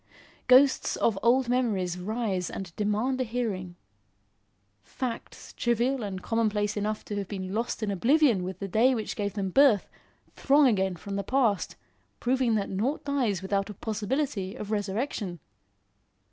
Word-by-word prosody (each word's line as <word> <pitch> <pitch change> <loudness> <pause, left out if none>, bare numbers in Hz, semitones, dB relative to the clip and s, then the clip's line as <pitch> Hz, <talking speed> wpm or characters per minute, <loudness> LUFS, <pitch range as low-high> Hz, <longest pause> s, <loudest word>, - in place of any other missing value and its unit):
Ghosts 260 +2 +5
of 210 -4 +1
old 250 +2 +3
memories 215 -8 0
rise 200 -2 -2
and 180 -4 -7
demand 215 +6 0
a - - +3
hearing. 215 -7 -3 1.1
Facts, 250 -3 -6
trivial 240 +2 0
and 195 -3 -5
commonplace 215 -2 0
enough 210 +1 -2
to 205 - -5
have 200 -2 -3
been 190 -2 -5
lost 230 +1 -2
in 205 - 0
oblivion 240 - +3
with 185 +1 -5
the 195 - -5
day 235 +7 +3
which 220 -2 -4
gave 205 -2 -2
them 195 -2 -2
birth, 265 -4 +5 0.5
throng 285 +1 +4
again 190 -6 +2
from 195 +4 -6
the 200 - -2
past, 235 -7 +1 0.4
proving 250 -2 +1
that 200 -2 -1
nought 230 +10 -1
dies 245 -10 0
without 195 +1 -1
a 210 - -7
possibility 220 -1 -2
of 210 -4 -6
resurrection. 205 - -2
215 Hz, 150 wpm, -27 LUFS, 195-250 Hz, 1.1 s, Ghosts